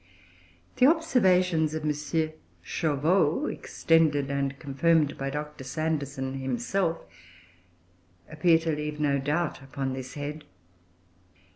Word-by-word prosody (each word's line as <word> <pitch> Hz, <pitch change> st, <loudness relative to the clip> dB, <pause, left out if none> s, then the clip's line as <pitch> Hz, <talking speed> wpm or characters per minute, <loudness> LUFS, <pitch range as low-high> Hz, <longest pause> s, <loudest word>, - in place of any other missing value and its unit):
The 255 Hz, -, +6 dB
observations 185 Hz, -, +3 dB
of 155 Hz, -, -4 dB
M. 150 Hz, -, +2 dB, 0.7 s
Chauveau, 155 Hz, -, +1 dB
extended 150 Hz, -4 st, +1 dB
and 140 Hz, -1 st, -1 dB
confirmed 145 Hz, +2 st, +2 dB
by 135 Hz, 0 st, -3 dB
Dr. 150 Hz, 0 st, -6 dB
Sanderson 140 Hz, -2 st, -3 dB
himself, 135 Hz, +8 st, -1 dB, 1.2 s
appear 165 Hz, +1 st, +3 dB
to 160 Hz, -1 st, -1 dB
leave 150 Hz, 0 st, -4 dB
no 140 Hz, -2 st, +2 dB
doubt 150 Hz, +4 st, -1 dB
upon 135 Hz, 0 st, -4 dB
this 130 Hz, -1 st, -7 dB
head. 150 Hz, +1 st, -5 dB
150 Hz, 105 wpm, -27 LUFS, 135-165 Hz, 1.2 s, The